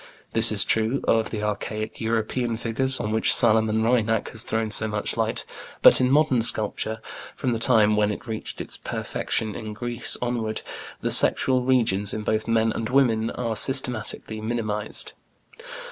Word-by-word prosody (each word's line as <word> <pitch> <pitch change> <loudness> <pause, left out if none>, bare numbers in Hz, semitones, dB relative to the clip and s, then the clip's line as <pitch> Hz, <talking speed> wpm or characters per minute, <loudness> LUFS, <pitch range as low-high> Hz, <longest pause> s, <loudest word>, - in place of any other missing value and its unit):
This 115 0 +5
is 105 -2 +3
true 110 +5 0
of 110 -1 +2
the 105 -2 -5
archaic 105 +1 -4
European 115 +1 -2
figures 130 +3 0
on 105 - -3
which 110 +1 +3
Salomon 110 -1 +2
Reinach 115 -2 0
has 110 - -2
thrown 110 -1 -2
so 110 +1 +1
much 105 -1 -2
light, - - -2 0.4
but - - +7
in 125 - +2
modern 140 -3 +3
sculpture, 110 -1 0 0.4
from 130 - -2
the 115 - -2
time 110 -3 +4
when 105 0 +1
it 105 - -7
reached 110 -2 -5
its - - -5
perfection 110 -2 -3
in 110 +1 -7
Greece 120 +2 -2
onward, 120 -3 -3 0.4
the - - -2
sexual 130 -1 +4
regions 115 -6 +1
in 110 - -5
both 110 +1 -2
men 115 -1 +1
and 110 0 -4
women 120 -4 +2
are 115 -3 -4
systematically 120 -4 +1
minimized. 110 -2 -3
110 Hz, 160 wpm, -23 LUFS, 110-120 Hz, 0.4 s, but